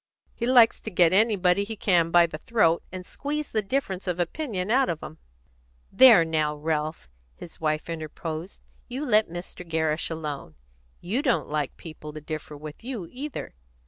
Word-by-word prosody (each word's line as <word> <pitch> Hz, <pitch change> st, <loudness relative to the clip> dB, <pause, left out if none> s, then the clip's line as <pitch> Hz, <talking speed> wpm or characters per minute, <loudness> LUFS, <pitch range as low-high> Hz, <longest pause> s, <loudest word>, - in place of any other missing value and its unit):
He 235 Hz, -, -3 dB
likes 245 Hz, -3 st, +6 dB
to -, -, -6 dB
get 175 Hz, -3 st, +4 dB
anybody 200 Hz, -3 st, +3 dB
he 220 Hz, +2 st, -6 dB
can 175 Hz, -5 st, +2 dB
by 175 Hz, 0 st, +6 dB
the 155 Hz, -2 st, -7 dB
throat, 170 Hz, -5 st, +2 dB
and 185 Hz, 0 st, -7 dB
squeeze 295 Hz, +5 st, -4 dB
the 215 Hz, -, +1 dB
difference 195 Hz, -4 st, -2 dB
of 180 Hz, -1 st, -1 dB
opinion 195 Hz, -, -2 dB
out 260 Hz, +1 st, +3 dB
of 160 Hz, -2 st, -3 dB
'em." 160 Hz, -, -9 dB, 0.7 s
"There, 220 Hz, -6 st, +8 dB
now, 155 Hz, -2 st, 0 dB
Ralph," 155 Hz, +1 st, -2 dB, 0.3 s
his 165 Hz, -, -12 dB
wife 155 Hz, -1 st, -1 dB
interposed, 160 Hz, +2 st, -6 dB, 0.3 s
"you 260 Hz, +4 st, -4 dB
let 215 Hz, -, +3 dB
Mr. 175 Hz, +1 st, -8 dB
Gerrish 160 Hz, -2 st, -1 dB
alone. 150 Hz, -, -5 dB, 0.5 s
You 210 Hz, +10 st, -1 dB
don't 270 Hz, -6 st, +1 dB
like 150 Hz, -2 st, -2 dB
people 155 Hz, -2 st, -9 dB
to 155 Hz, -, -6 dB
differ 155 Hz, -1 st, -6 dB
with 150 Hz, +6 st, -10 dB
you, 235 Hz, -8 st, -5 dB
either. 285 Hz, +3 st, -6 dB
175 Hz, 170 wpm, -26 LUFS, 155-220 Hz, 0.7 s, There